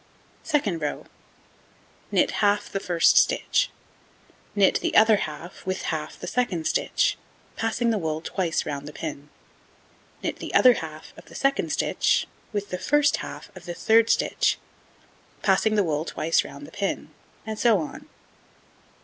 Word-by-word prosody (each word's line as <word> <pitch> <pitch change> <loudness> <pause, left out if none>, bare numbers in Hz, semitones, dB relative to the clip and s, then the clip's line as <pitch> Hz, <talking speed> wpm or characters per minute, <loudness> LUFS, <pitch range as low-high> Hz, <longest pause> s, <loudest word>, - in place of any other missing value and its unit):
Second 215 - 0
row: 150 - -3 1.1
Knit - - +3
half 205 0 +2
the 195 - -1
1st 175 -3 +3
stitch, - - +3 0.9
knit 200 -2 +4
the - - -2
other 220 -1 +7
half 165 +2 -6
with 185 0 -3
half 155 -1 -5
the - - -6
2d 190 -10 -1
stitch, - - +1 0.4
passing 230 +1 0
the 215 - 0
wool 160 -2 -2
twice 165 0 -2
round 145 -1 -5
the 150 - -8
pin, 150 -2 -6 0.9
knit - - -2
the - - -6
other 250 -1 +8
half 155 -6 -8
of - - -13
the - - -15
2d 275 +1 +1
stitch - - +1 0.3
with 205 -2 -4
the 180 - -3
1st 295 +7 +3
half 205 - -8
of 180 -2 -11
the 175 - -5
3d 225 +3 +4
stitch, - - +2 0.9
passing 195 +2 +3
the 205 - +3
wool 155 -3 -1
twice 165 0 +1
round 140 +1 -10
the - - -13
pin, 200 -1 -3 0.3
and 220 -1 -5
so 230 -3 +5
on. 160 -4 -6
190 Hz, 155 wpm, -25 LUFS, 160-220 Hz, 1.1 s, other